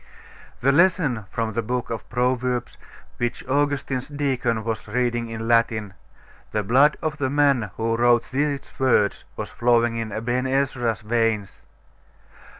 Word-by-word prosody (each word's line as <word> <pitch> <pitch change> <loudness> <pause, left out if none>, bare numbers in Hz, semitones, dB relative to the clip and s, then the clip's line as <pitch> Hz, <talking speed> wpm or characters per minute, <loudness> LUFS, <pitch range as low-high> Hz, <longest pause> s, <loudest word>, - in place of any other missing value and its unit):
That 135 +3 +4
lesson 155 - +3
from 115 -1 -2
the 115 - 0
book 125 +2 -3
of 115 - -5
Proverbs, 125 0 -1 0.4
which 120 -1 -3
Augustine's 140 -1 0
deacon 130 -6 -1
was 110 -1 -4
reading 120 -2 -1
in 115 0 -5
Latin 115 -3 +2 0.6
the 105 - -1
blood 135 +9 +4
of 155 -1 -2
the 130 -2 0
man 140 -6 +2
who 115 0 0
wrote 120 0 +3
these 140 +1 0 0.2
words 120 -6 +2
was - - -5
flowing 120 -1 +2
in 115 -2 -3
Aben 120 +4 -1
Ezra's 130 -4 0
veins.... 110 -2 -1
120 Hz, 140 wpm, -23 LUFS, 115-135 Hz, 0.6 s, That